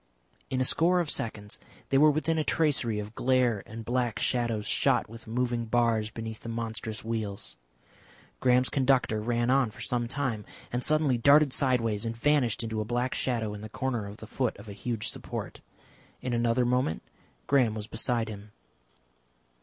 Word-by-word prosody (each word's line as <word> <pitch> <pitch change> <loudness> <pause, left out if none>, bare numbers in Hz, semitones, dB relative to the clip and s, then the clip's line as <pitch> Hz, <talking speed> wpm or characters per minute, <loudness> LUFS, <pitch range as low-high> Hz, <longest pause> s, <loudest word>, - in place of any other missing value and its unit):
In 130 - -1
a - - +3
score 175 +7 +4
of 170 -4 0
seconds 105 -2 -4 0.3
they 135 - +3
were 155 +1 +7
within 155 +2 +1
a - - +1
tracery 140 -9 +1
of 105 +1 -5
glare 125 -4 +2
and 110 +1 -8
black 120 -1 0
shadows 115 -4 0
shot - - +2
with 115 +1 -12
moving 120 0 -1
bars 115 -2 +1
beneath 110 0 -6
the 115 - -8
monstrous 110 -1 -4
wheels. 100 - -4 0.8
Graham's 125 0 +3
conductor 130 -5 +2
ran 120 +2 +1
on 135 -3 +3
for 105 - -12
some 120 -2 -1
time, 125 -4 -2 0.3
and 125 +1 -1
suddenly 150 -5 +2
darted 140 +2 +5
sideways 115 -6 +1
and 115 0 -3
vanished 125 -4 +2
into 110 -1 -2
a - - 0
black 120 +3 -1
shadow 115 -5 -1
in 105 - -7
the 110 - -7
corner 120 -3 -2
of 100 +1 -9
the 110 - -9
foot 125 +2 -2
of - - -12
a 100 - -7
huge 115 +1 -3
support. - - -6 0.6
In 125 - -3
another 120 +1 +2
moment 125 -9 0 0.4
Graham 125 -6 +3
was 105 -1 -4
beside 115 +1 0
him. 105 -1 -9
120 Hz, 175 wpm, -28 LUFS, 110-130 Hz, 0.8 s, were